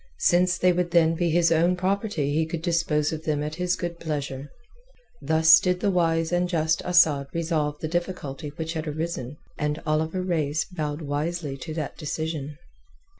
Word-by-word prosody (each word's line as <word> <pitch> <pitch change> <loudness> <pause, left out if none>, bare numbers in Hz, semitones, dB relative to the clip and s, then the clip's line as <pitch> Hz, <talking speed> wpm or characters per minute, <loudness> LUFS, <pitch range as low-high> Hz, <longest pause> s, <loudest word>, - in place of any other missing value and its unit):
Since 180 +1 +3
they 180 -1 +3
would 175 0 0
then 165 -1 +4
be 170 +1 0
his 170 +1 +3
own 170 +2 +3
property 185 -5 -1
he 160 +1 +1
could 165 0 -5
dispose 165 -3 +1
of 160 0 -5
them 150 -2 -1
at 150 +1 -4
his 180 0 +1
good 170 -1 -5
pleasure. 145 -3 -4 0.7
Thus 160 +3 +6
did 180 -1 0
the 200 - +1
wise 165 -2 +1
and 175 0 +1
just 160 -1 +1
Asad 160 -6 +3
resolve 160 -3 -1
the 155 - -2
difficulty 165 -4 -3
which 160 0 -4
had 160 -1 -4
arisen, 150 -3 -4 0.2
and 150 +1 -1
Oliver 160 +4 0
Reis 160 -4 0
bowed 155 -4 -4
wisely 150 +1 -2
to 155 +3 -7
that 155 -3 -5
decision. 155 -2 -4
160 Hz, 175 wpm, -25 LUFS, 150-175 Hz, 0.7 s, Thus